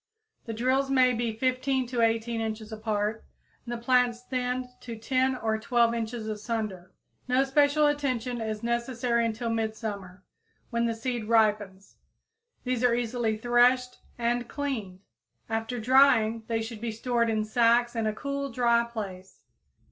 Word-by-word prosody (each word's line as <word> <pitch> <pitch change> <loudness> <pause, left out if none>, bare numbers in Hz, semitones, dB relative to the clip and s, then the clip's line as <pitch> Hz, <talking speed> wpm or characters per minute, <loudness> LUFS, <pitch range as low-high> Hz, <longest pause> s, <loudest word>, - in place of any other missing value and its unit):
The 225 - -3
drills 260 +4 +1
may 255 -2 +4
be 230 -1 -1
15 255 +3 0
to 245 -2 -1
18 230 0 +1
inches 220 0 -4
apart 215 0 -2 0.4
and 240 - -7
the 240 - -2
plants 245 0 +2
thinned 250 0 -2
to 235 -2 -7
10 260 +3 +1
or 220 -3 -1
12 235 +1 +2
inches 230 -1 -4
asunder. 210 -4 -4 0.4
No 255 +1 +3
special 285 +2 +3
attention 255 -5 -1
is 220 0 -4
necessary 235 0 0
until 230 +1 -3
midsummer, 215 -4 -4 0.5
when 235 0 +1
the 230 - -1
seed 235 -1 -3
ripens. 210 -3 +1 0.7
These 250 -1 -1
are 245 -1 +4
easily 235 -2 -1
threshed 245 +2 +3 0.2
and 240 0 0
cleaned. 225 -11 -4 0.5
After 225 +2 -3
drying 230 -3 +4
they 225 -1 -1
should 225 -1 -7
be 230 -1 -2
stored 235 +1 0
in 215 -1 0
sacks 235 +2 +3
in 225 -1 0
a 215 - 0
cool, 280 +2 -3
dry 235 -1 +3
place. 195 -5 -8
235 Hz, 150 wpm, -27 LUFS, 220-250 Hz, 0.7 s, may